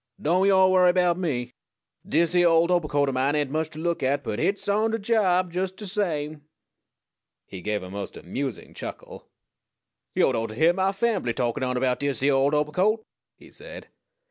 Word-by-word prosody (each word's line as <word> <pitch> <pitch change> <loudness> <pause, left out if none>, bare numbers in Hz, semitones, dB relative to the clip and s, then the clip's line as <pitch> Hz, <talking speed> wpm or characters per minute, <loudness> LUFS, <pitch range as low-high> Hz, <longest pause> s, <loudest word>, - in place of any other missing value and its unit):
"Don't 180 +5 +2
yo' 190 -1 +5
worry 185 -1 +5
erbout 180 -1 +2
me. 125 -8 -2 0.5
Dis 165 +2 +1
yere 175 -1 +4
old 165 +1 +3
obercoat 150 -5 +1
o' - - 0
mine 135 +3 0
ain't 145 -3 -1
much 155 +1 -1
to 155 - -11
look 170 0 -1
at; 140 +2 0
but 105 - -3
hit's 200 - -1
on 210 +2 +2
de 225 - -1
job 190 -5 +1
jes' 185 +1 -1
de 190 +3 -11
same." 155 -7 -2 1.0
He 95 -2 -9
gave 105 0 -2
a 90 - -8
most 100 0 -6
amusing 135 -6 -5
chuckle. - - -9 0.9
"Yo'd - - +3
ought 115 0 -1
to 110 - -9
hyear 165 +7 +4
mah 190 +1 +1
fambly 195 - -1
takin' 120 -1 -1
on 125 -1 -1
erbout 125 0 0
dis 140 -3 -1
yere 140 0 +4
old 135 +2 +2
obercoat!" 185 +9 +1 0.3
he - - -17
said. - - -10
160 Hz, 190 wpm, -25 LUFS, 135-185 Hz, 1.0 s, yo